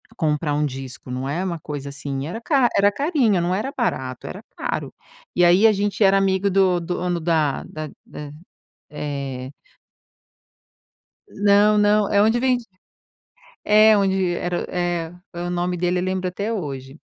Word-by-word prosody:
comprar 150 -4 0
um 150 0 +1
disco, 130 -2 -7
não 130 +2 -3
é 165 +6 -2
uma 170 -3 -3
coisa 145 -2 -6
assim. 140 -1 -5
Era 200 +7 -5
ca 265 -3 +3
era 200 +1 +5
carinho, 260 - +1
não 175 +2 0
era 220 +8 -2
barato, 130 - -2
era 195 - -7 0.2
caro. - - -3 0.4
E 175 - +3
aí 180 +6 +6
a 215 - +4
gente 205 +2 -2
era 195 0 +5
amigo 195 0 +2
do 185 -2 +3
do 175 +1 -3
dono 175 -1 -1
da 160 -4 0
da 155 -1 -7 0.2
da, 145 -1 -9 0.6
eh 140 -3 -5 1.8
Não, 205 +1 +4
não. 210 0 +3
É 200 - +4
onde 225 +3 +3
vedi 250 -2 +1 1.0
é 215 0 +6
onde 190 -3 +1
era 175 0 -2
é 175 -2 -2 0.3
o 175 0 -3
nome 180 0 -1
dele 180 +1 0
eu - - -3
lembro 185 0 -1
até 200 +5 -3
hoje. 140 -6 -5
180 Hz, 160 wpm, -22 LUFS, 150-205 Hz, 1.8 s, aí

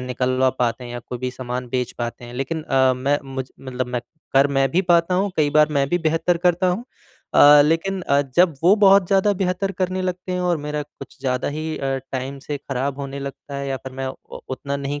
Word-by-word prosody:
निकलवा 130 +1 +1
पाते 125 +1 0
हैं 120 - -8
या 120 - -4
कोई 120 +1 -7
भी 130 +1 -3
सामान 125 0 -5
बेच 125 0 -2
पाते 120 0 -4
हैं। 120 0 -10
लेकिन 135 +5 -3
अ, 130 -3 +3
मैं 140 +3 +1 0.2
मुझ 130 -1 -4
मतलब 130 -1 -4
मैं 125 0 -3 0.3
कर 135 +1 +5
मैं 135 -1 +1
भी 180 +7 +2
पाता 175 0 +3
हूँ, 195 +2 +1
कई 150 -2 +2
बार 150 0 +5
मैं 140 -2 +1
भी 175 - +1
बेहतर 165 +1 +1
करता 180 +1 +3
हूँ। 185 +7 -1 0.5
अ, 145 0 +8
लेकिन 165 +5 0
अ, 140 -4 +2 0.2
जब 175 -2 +5
वो 180 +4 +6
बहुत 195 -2 +6
ज़्यादा 195 +2 +3
बेहतर 190 0 -1
करने 185 0 -2
लगते 185 0 -3
हैं 180 - -1
और 180 -1 +1
मेरा 150 0 -3
कुछ 145 +1 -13
ज़्यादा 125 -2 -1
ही 155 +2 -4
अ, 135 -1 -1 0.2
टाइम 135 +1 -4
से 145 +2 -5
ख़राब 135 +1 -3
होने 140 0 -5
लगता 140 +1 -8
है 140 0 -3
या 135 - -1
फिर 130 0 -9
मैं 135 0 -4
उ 130 - -9
उतना 140 +2 -3
नहीं 140 +1 -4
140 Hz, 230 wpm, -22 LUFS, 130-175 Hz, 0.5 s, अ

